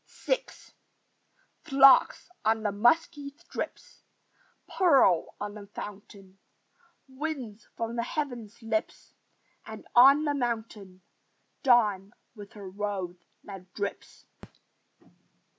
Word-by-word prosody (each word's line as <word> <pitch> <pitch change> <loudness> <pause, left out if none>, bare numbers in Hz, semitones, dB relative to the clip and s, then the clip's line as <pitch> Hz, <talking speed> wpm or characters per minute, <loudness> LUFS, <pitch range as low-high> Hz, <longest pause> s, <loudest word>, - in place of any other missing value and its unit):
VI - - +1 1.2
Flocks 275 -4 +5 0.2
on 220 0 +1
the 205 - 0
musky 280 +7 +1
strips; 355 +8 -8 0.7
Pearl 270 - +3
on 205 0 -5
the 205 -1 -11
fountain: 195 -1 -10 0.7
Winds 265 -6 -6
from 230 +1 -4
the - - +1
heavens' 240 -6 -5
lips; 220 -1 -3 0.5
And, - - -10
on 275 +5 +7
the 290 - 0
mountain, 220 -7 -4 0.6
Dawn 210 -7 +2 0.2
with 205 -1 -12
her 205 -3 -10
rose 190 -2 -5 0.2
that 190 -2 -11
drips. 200 -1 -6
225 Hz, 95 wpm, -28 LUFS, 200-270 Hz, 1.2 s, on